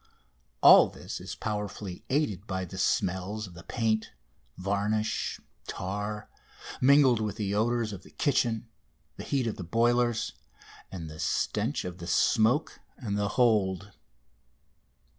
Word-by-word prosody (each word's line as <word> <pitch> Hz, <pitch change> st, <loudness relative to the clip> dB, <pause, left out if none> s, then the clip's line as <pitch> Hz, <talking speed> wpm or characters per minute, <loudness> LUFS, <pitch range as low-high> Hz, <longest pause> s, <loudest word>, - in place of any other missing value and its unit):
All -, -, +9 dB
this -, -, -8 dB
is -, -, -6 dB
powerfully 105 Hz, -3 st, -5 dB
aided 110 Hz, -, 0 dB
by 95 Hz, -1 st, -2 dB
the 95 Hz, +2 st, -8 dB
smells 100 Hz, -1 st, 0 dB
of 90 Hz, -, -12 dB
the 85 Hz, -, -11 dB
paint, 110 Hz, +1 st, -1 dB, 0.4 s
varnish, 100 Hz, +3 st, -1 dB, 0.3 s
tar, 105 Hz, +3 st, -4 dB, 0.5 s
mingled 130 Hz, -3 st, +5 dB
with 105 Hz, -2 st, -2 dB
the 100 Hz, -2 st, -2 dB
odours 115 Hz, 0 st, +1 dB
of 95 Hz, -, -8 dB
the -, -, -16 dB
kitchen, 120 Hz, -6 st, 0 dB, 0.5 s
the -, -, -6 dB
heat 135 Hz, -3 st, 0 dB
of 115 Hz, -, -3 dB
the 95 Hz, -, -5 dB
boilers, 120 Hz, +4 st, +1 dB, 0.6 s
and 85 Hz, -4 st, -6 dB
the 75 Hz, 0 st, -10 dB
stench -, -, -1 dB
of 90 Hz, 0 st, -6 dB
the 85 Hz, -, -7 dB
smoke 120 Hz, -, +2 dB, 0.2 s
and 105 Hz, -7 st, -3 dB
the 100 Hz, 0 st, 0 dB
hold. 105 Hz, -5 st, +2 dB
105 Hz, 135 wpm, -29 LUFS, 95-120 Hz, 0.6 s, All